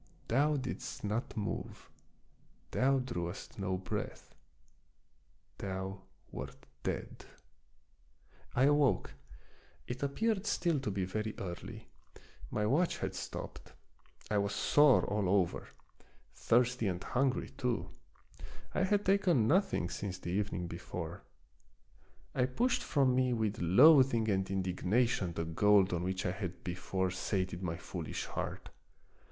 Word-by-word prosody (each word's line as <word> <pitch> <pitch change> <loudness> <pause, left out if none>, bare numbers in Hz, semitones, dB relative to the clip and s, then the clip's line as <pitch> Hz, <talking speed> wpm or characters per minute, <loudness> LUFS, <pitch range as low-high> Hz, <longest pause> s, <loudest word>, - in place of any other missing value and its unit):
Thou 145 +5 +3
didst 130 -1 -5
not 110 +4 -2
move; 105 - -4 0.8
thou 135 +1 +3
drewest 90 -8 -4
no 95 -1 -1
breath; 90 - -5 1.3
thou 95 0 -4 0.3
wert - - -8 0.2
dead! - - -4 1.3
I 125 - +4
awoke. 145 -1 +3 0.7
It 125 +7 -5
appeared 210 +9 0
still 170 -5 +1
to 130 - -3
be 95 -2 -1
very 110 +3 -3
early. 90 -2 -7 0.6
My 105 - 0
watch 155 +11 +2
had - - -3
stopped. - - -7 0.6
I 105 - +3
was 100 +1 -1
sore 145 +7 +5
all 100 -3 0
over; 95 -3 +1 0.7
thirsty 120 -1 +2
and 90 -1 -2
hungry 130 +1 0
too; 125 -3 -2 0.8
I 185 - +2
had 205 +1 +1
taken 180 - +3
nothing 180 - +2
since 95 -3 -4
the 90 -1 -5
evening 95 -2 -1
before. 85 0 -6 1.1
I 125 - +2
pushed 240 - +1
from 135 -4 +2
me 130 0 +2
with 110 -3 -1
loathing 125 - +6
and 95 -1 0
indignation 95 +1 +1
the 80 0 -2
gold 100 +3 +4
on 85 - 0
which 95 +1 -2
I - - +1
had 90 -2 -5
before 90 +1 -2
sated 95 -1 -2
my 85 -3 -2
foolish - - -5
heart. - - -5
105 Hz, 125 wpm, -33 LUFS, 95-130 Hz, 1.3 s, loathing